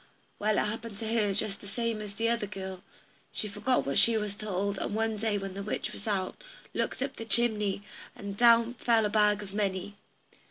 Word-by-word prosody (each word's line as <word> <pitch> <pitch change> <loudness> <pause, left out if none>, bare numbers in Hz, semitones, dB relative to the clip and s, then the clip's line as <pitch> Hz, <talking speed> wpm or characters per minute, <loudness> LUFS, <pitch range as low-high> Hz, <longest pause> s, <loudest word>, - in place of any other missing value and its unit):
Well, 210 0 +2
it - - +3
happened 220 0 -4
to 220 +1 -2
her 210 -3 +2
just 200 0 -1
the 200 - -10
same 230 +1 -2
as 205 -1 -7
to - - -21
the 230 0 +2
other 230 -3 0
girl 190 -2 -6 0.5
she 215 - -1
forgot 250 +5 +1
what 140 - +2
she 230 -1 +5
was 210 -2 -2
told, 200 -1 -2
and 205 - -2
one 225 0 +1
day 215 0 0
when 195 -1 -4
the 200 - -5
witch 205 - -3
was 205 - -8
out, 195 - -1 0.3
looked - - -1
up 270 - -4
the - - -5
chimney, 210 -2 +3 0.3
and 200 -1 -6
down 235 +1 +6
fell 230 -2 +3
a - - +1
bag 210 0 +3
of 195 -1 -10
money. 200 -1 -1
210 Hz, 215 wpm, -30 LUFS, 200-225 Hz, 0.5 s, down